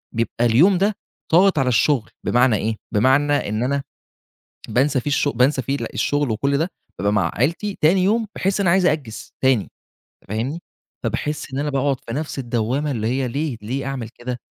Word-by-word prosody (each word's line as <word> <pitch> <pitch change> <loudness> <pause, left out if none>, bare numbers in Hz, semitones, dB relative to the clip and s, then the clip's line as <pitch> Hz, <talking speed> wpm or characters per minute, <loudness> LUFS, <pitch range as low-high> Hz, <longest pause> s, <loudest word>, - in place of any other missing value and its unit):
بيبقى 115 0 -1
اليوم 155 - +5
ده 200 +3 +1 0.4
ضاغط 185 -1 +5
على 135 - +1
الشغل، 125 0 +2 0.2
بمعنى 125 -1 +3
إيه، 110 +1 -2 0.2
بمعنى 135 +7 +3 0.2
إن 110 +3 -1
أنا 140 +2 0 0.9
بانسى 130 +4 +2
فيه 145 - -3
الش 145 - +2
بانسى 130 +1 +2
فيه 135 +4 -1 0.2
الشغل 145 -2 0
وكل 140 +6 0
ده، 165 +5 -1 0.3
بابقى 100 +3 +1
مع 95 -5 +1
عائلتي، 170 - -1
تاني 180 +4 +4
يوم 220 +3 +2
باحس 195 +2 0
إن 200 - +1
أنا - - +5
عايز 190 -1 +3
أأجِّز 145 -9 -2
تاني، 130 -6 +2 0.6
فاهمني؟ 120 +10 -3 0.4
فباحس 135 +6 -3
إن - - -2
أنا 145 +1 -1
باقعُد 140 0 +1
في 115 - -5
نَفس 150 +1 -4
الدوامة، 125 +4 -1
اللي 110 -5 -2
هي 130 +1 0
ليه، 140 +1 -2
ليه 130 +6 -3
أعمل 135 -4 -4
كده! 120 +1 -6
135 Hz, 180 wpm, -21 LUFS, 120-150 Hz, 0.9 s, اليوم